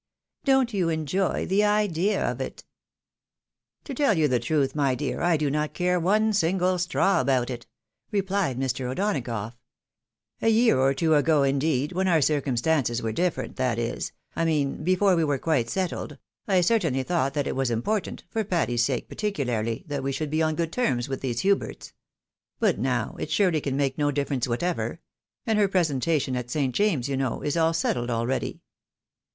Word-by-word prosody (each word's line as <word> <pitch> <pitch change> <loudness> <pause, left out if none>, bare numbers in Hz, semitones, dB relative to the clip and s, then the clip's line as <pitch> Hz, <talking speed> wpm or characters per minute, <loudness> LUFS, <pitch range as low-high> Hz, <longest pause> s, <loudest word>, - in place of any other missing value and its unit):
Don't 265 -4 +3
you 180 -4 +1
enjoy 165 +4 -1
the 200 +2 +2
idea 210 -2 +1
of - - -3
it?" - - -6 0.6
" - - -61
To 280 - -5
tell 260 - +2
you 155 -2 +3
the 125 -3 +1
truth, 145 -2 0
my 140 -3 +1
dear, 135 -2 -3
I 175 -1 +3
do 150 -2 0
not 150 +1 -2
care 180 0 +1
one 215 +5 +2
single 185 -1 +1
straw 180 +2 +2
about 130 -2 +1
it," 120 -1 -7 0.4
replied 195 - 0
Mr. 130 -1 -2
O'Donagough. 125 - -2 0.5
" - - -47
A - - +1
year 225 - +4
or 135 +1 +3
two 160 +3 +2
ago, 150 -1 +3
indeed, 140 +1 +1
when 190 +1 0
our 170 -3 +4
circumstances 135 -3 +1
were 110 - -1
different, 175 +8 -2
that 125 -3 0
is, 115 0 -3 0.2
I 165 - 0
mean, 155 -3 0
before 185 +2 +3
we 165 - +2
were 145 -3 +1
quite 135 -5 0
settled, 185 +2 -3 0.3
I 190 -3 +3
certainly 165 - +1
thought 140 -4 0
that 145 -2 0
it - - -2
was 135 -1 0
important, 180 - -2
for 225 -1 0
Patty's 165 - 0
sake 125 -1 -1
particularly, 120 - -2
that 145 -3 -3
we 135 +1 -2
should 145 +2 -3
be 155 +1 +1
on 155 -1 +1
good 165 0 -2
terms 130 - 0
with 135 - -4
these 120 -3 -2
liuberts, 200 0 -1 0.3
— - - -62
^but - - +2
now, 120 -2 -1
it - - -4
surely 165 -2 +2
can 135 -1 -2
make 140 0 0
no 145 0 +2
difference 140 -3 -1
whatever 170 +9 -2 0.2
— - - -65
and 220 -3 +1
her 205 - +4
presentation 155 -6 0
at 125 -1 -4
St. 135 -1 -1
James's, 165 - +1
you 135 -1 -2
know, 130 -3 -2
is 145 - -1
all 165 -1 +3
settled 125 -7 -1
abeady." 120 +2 -2
150 Hz, 190 wpm, -26 LUFS, 130-185 Hz, 0.6 s, year